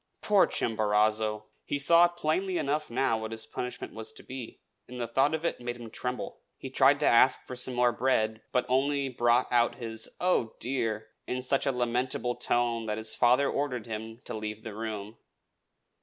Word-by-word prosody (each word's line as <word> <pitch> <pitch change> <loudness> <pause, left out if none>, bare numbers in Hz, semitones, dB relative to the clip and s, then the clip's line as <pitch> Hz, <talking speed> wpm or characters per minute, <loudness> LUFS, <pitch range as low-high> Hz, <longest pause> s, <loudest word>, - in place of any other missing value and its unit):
Poor 205 -2 +5
Chimborazo! 110 0 +1 0.2
He 145 - -2
saw 170 +5 +6
plainly 175 +2 -1
enough 150 +1 -1
now 120 -2 +1
what 110 0 -5
his 110 0 -2
punishment 125 0 -6
was 110 0 -7
to - - -13
be; 130 -3 -8 0.3
and 125 0 -8
the 120 - -1
thought 135 +6 +2
of 160 +1 -5
it 170 - -2
made 120 0 -4
him 115 -2 -10
tremble. 125 +2 -5 0.2
He 135 - -8
tried 135 +2 +5
to - - +2
ask 120 +3 +5
for 125 - -6
some 125 0 +1
more 120 0 +4
bread, 110 -4 0
but 125 - +1
only 140 +2 +1
brought 120 0 +2
out 120 -1 +3
his 115 -3 -6
"Oh, 175 -11 +1
dear!" 115 -4 -2 0.2
in 125 0 -2
such 135 +2 +1
a - - +4
lamentable 125 0 -1
tone 120 -2 0
that 105 0 -2
his 110 0 -3
father 125 +3 +4
ordered 130 -6 -2
him 110 +1 -6
to - - -6
leave 110 0 -5
the 110 - -6
room. 110 0 -5
120 Hz, 185 wpm, -29 LUFS, 110-135 Hz, 0.3 s, saw